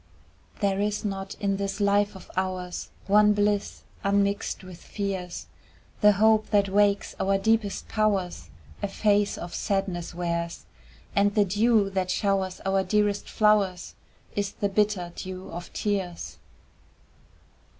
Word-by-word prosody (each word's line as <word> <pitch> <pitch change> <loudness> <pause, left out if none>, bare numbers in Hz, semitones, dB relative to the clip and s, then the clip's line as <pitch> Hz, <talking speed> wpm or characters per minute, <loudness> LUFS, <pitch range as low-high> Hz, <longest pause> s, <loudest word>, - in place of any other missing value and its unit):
There 200 -1 +1
is 210 +1 -1
not 195 -1 -4
in 200 -1 -1
this 200 +1 -3
life 205 0 +2
of 190 - -12
ours 185 -1 -3 0.2
One 210 +1 +5
bliss 205 0 0 0.2
unmixed 200 0 0
with 185 -2 -11
fears, 190 -3 -4 0.5
The 210 -1 +6
hope 215 +2 +3
that 200 -2 +3
wakes 200 0 +2
our 195 0 +2
deepest 215 0 0
powers 190 - 0 0.3
A - - 0
face 205 0 +1
of 175 0 -7
sadness 190 -4 -2
wears, 170 -1 -3 0.5
And 205 0 +3
the 205 -2 +4
dew 205 +1 +3
that 190 -1 -1
showers 190 -1 0
our 195 0 +2
dearest 205 +1 0
flowers 205 -4 +2 0.4
Is 200 -1 -1
the 200 - -1
bitter 195 -4 0
dew 185 0 -7
of 175 +1 -7
tears. 195 -4 -3
200 Hz, 130 wpm, -26 LUFS, 185-205 Hz, 0.5 s, The